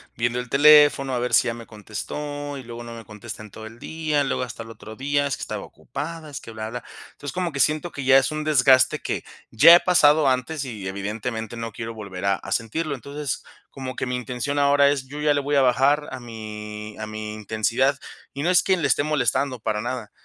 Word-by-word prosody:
viendo 120 +1 0
el 125 - -5
teléfono 145 -1 +6
a 125 - 0
ver 125 +1 -2
si 120 - +5
ya - - -2
me 115 0 -9
contestó 145 +8 -6
y 135 - -8
luego 120 0 -8
no 115 - -8
me 115 - -9
contesta 110 +1 -9
en 105 - -13
todo 110 - -10
el 110 +1 -11
día, 155 +1 -1
luego 135 - -1
hasta 120 -2 -7
el 115 - -13
otro 110 0 -10
día, 145 +3 0
es 140 - -2
que - - -12
estaba - - -4
ocupada, 165 -2 -7
es 140 - -6
que 115 - -11
bla, 110 0 -5
bla. 125 +1 -6 0.3
Entonces, 145 - -8
como 180 -2 -1
que 140 - -5
siento 155 +5 +1
que 140 - -6
ya 135 0 +7
es 135 +2 +2
un 155 0 -3
desgaste 130 -3 +4
que - - -4 0.3
ya 155 +9 +9
he - - +7
pasado 150 -5 +5
antes 135 +4 -1
y 110 -7 -6
evidentemente 110 +4 -4
no 115 -1 -5
quiero 115 +1 -6
volver 100 -4 -8
a 100 0 +3
a - - -5
sentirlo. 140 +7 -2
Entonces, 140 +2 -5 0.3
como 130 -1 -7
que - - -1
mi 125 0 -2
intención 125 +3 -3
ahora 140 0 +5
es, 135 -2 -3
yo 145 +3 -8
ya 150 0 +3
le 145 - +1
voy 145 +1 -1
a - - +5
bajar 140 +3 +3
a 130 - -6
mi 105 -2 -8
a 110 - -3
mi 110 0 -6
intensidad. 110 +6 0 0.3
Y 140 +1 -4
no 175 - +2
es 180 -2 +5
quien 185 -3 +2
le 140 - +2
esté 145 - +2
molestando, 140 -3 0
para 105 -1 -2
nada, 120 -3 -4
130 Hz, 235 wpm, -23 LUFS, 115-145 Hz, 0.3 s, ya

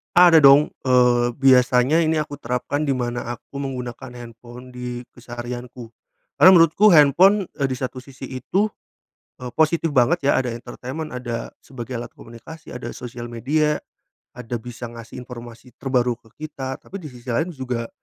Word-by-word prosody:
Ada 175 -2 +8
dong, 140 +1 +6 0.2
eee, 125 -1 +4
biasanya 130 +2 +4
ini 160 0 +1
aku 145 -1 -7
terapkan 130 +5 -2
di 135 - +1
mana 120 -1 -3
aku 140 +4 -11
menggunakan 125 -2 -6
handphone 120 +1 -12
di 125 0 -6
keseharianku. 120 0 -8 0.5
Karena 185 - +9
menurutku 170 +5 +5
handphone, 180 +7 +5
eee, 135 - +2
di 130 - -3
satu 130 0 -5
sisi 135 +1 -14 0.2
itu, 200 - 0 0.7
eee, 125 -1 -7
positif 160 0 +1
banget 140 +4 +3
ya - - +4
ada 125 - -4
entertainment, 125 +6 -7
ada 120 -2 -5
sebagai 130 -1 -8
alat 120 - -6
komunikasi, 155 +8 -12
ada 125 -1 -6
sosial 120 -1 -8
media, 150 +6 0 0.6
ada 125 -1 -6
bisa 120 +1 -9
ngasih 115 0 -11
informasi 120 0 -11
terbaru 125 -2 +1
ke 115 - -22 0.2
kita, 130 -3 -6
tapi 195 - -10
di 155 - -8
sisi 125 -3 -14
lain 160 +9 0
juga 125 -6 -4
125 Hz, 155 wpm, -22 LUFS, 120-145 Hz, 0.7 s, Karena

